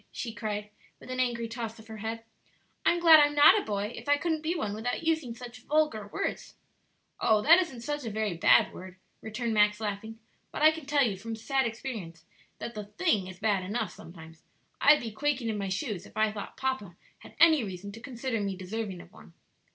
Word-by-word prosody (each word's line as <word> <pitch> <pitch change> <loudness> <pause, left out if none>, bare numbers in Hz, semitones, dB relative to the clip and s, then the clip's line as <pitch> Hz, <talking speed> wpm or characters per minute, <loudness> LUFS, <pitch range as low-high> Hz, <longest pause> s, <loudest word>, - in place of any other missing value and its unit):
she 230 -2 -5
cried, 210 -1 -4 0.3
with - - -10
an 255 - -3
angry 240 -2 0
toss 230 -1 -6
of 220 - -14
her 220 -1 -9
head; 225 +1 -5 0.6
"I'm 345 - +3
glad 325 -2 +9
I'm 290 0 +3
not 290 - +7
a - - -9
boy 210 +1 -3
if - - -8
I 290 - +5
couldn't 320 0 -1
be 320 +3 -1
one 210 -11 -2
without 235 +8 -3
using 315 -8 0
such 240 0 -10
vulgar 300 -9 0
words." - - -4 0.6
"Oh, 215 -1 +3
that 335 +4 +8
isn't 270 -10 -6
such 295 +3 -3
a 230 - -3
very 215 -3 -2
bad 165 - +4
word," 185 0 -10 0.3
returned 225 +1 -3
Max, 210 0 +3
laughing; 220 +1 -4 0.3
"but - - -3
I 310 - +8
can 315 -3 -9
tell 285 -1 +3
you, 210 -6 0
from 225 +3 -6
sad 265 +3 0
experience, 215 -9 -7 0.3
that 235 - -6
the 210 -2 -6
thing 210 - 0
is 185 -1 -9
bad 205 -2 +1
enough 205 +1 -2
sometimes; 160 -1 -13 0.4
I'd 295 +1 +6
be 230 -2 -5
quaking 270 0 -1
in 210 -2 -2
my 195 -1 -3
shoes 200 - -3
if - - -15
I 215 0 +3
thought 210 -1 -8
papa 260 -10 -3 0.2
had - - -15
any 315 -6 +6
reason 195 0 -6
to 225 +3 -11
consider 245 -3 -3
me 200 -1 -2
deserving 190 -1 -5
of - - -16
one." 80 +3 -16
225 Hz, 215 wpm, -29 LUFS, 205-270 Hz, 0.6 s, glad